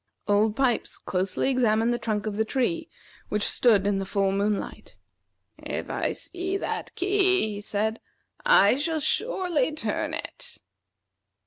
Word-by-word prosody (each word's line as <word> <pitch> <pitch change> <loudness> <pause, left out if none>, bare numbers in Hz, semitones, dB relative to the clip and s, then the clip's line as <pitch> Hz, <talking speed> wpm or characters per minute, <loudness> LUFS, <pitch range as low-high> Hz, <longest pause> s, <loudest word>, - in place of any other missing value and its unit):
Old 210 +1 +3
Pipes 255 -3 0
closely 185 +7 -1
examined 230 -2 +2
the 240 - -2
trunk 215 -2 -2
of 215 -2 -3
the 220 - +1
tree, 290 +8 -1 0.4
which 210 0 0
stood 215 -6 +3
in 200 -1 +1
the - - -2
full 195 0 +1
moonlight. 200 +1 -2 0.6
"If - - -5
I - - -1
see 370 +2 -3
that - - -4
key," 375 - +2
he 205 - -6
said, 215 +2 -1 0.4
"I 265 - +5
shall 315 +2 -1
surely 350 - 0
turn 310 - -2
it." - - -7
230 Hz, 140 wpm, -26 LUFS, 205-320 Hz, 0.6 s, I